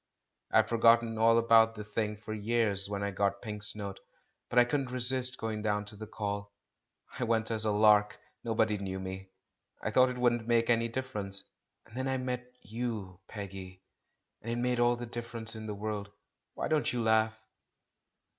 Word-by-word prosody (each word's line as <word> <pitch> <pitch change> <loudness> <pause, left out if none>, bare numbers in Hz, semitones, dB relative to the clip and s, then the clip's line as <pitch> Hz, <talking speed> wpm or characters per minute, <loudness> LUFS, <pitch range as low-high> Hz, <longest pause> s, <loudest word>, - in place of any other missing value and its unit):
I - - -3
had - - +4
forgotten 115 -1 +4
all 115 +1 +5
about 115 -1 +5
the 105 - -6
thing 105 0 -2
for 110 +1 -7
years 105 -2 +1
when 100 -1 -3
I 100 - -1
got 100 0 0
Pink's 105 -2 -1
note, 100 -2 -6 0.5
but 120 - -3
I 120 - +8
couldn't 135 0 -1
resist 130 +1 +1
going 110 -1 -3
down 105 -1 0
to 105 - -9
the 110 +1 -8
Call; 100 -1 -4 0.7
I - - 0
went 115 -1 +1
as 110 -1 -1
a 105 - +2
lark, 105 0 +4 0.3
nobody 110 -2 +1
knew 95 -1 -4
me, 95 0 -6 0.5
I - - -3
thought 130 0 +5
it 125 - -5
wouldn't 120 -2 +1
make 115 0 +3
any 115 0 +2
difference. 110 -6 -4 0.4
And 110 - -16
then 130 +1 -2
I 130 0 0
met 125 -1 -4
you, 105 -4 -5
Peggy 95 -3 -8 0.3
— - - -52
and 115 - -5
it - - -1
made 125 0 0
all 120 0 +4
the 120 0 -6
difference 115 -1 -6
in 110 0 -7
the 105 - -4
world. 105 -1 -4 0.5
Why - - -2
don't 155 -1 +1
you 120 -2 -1
laugh?" 110 0 +3
110 Hz, 190 wpm, -31 LUFS, 105-120 Hz, 0.7 s, I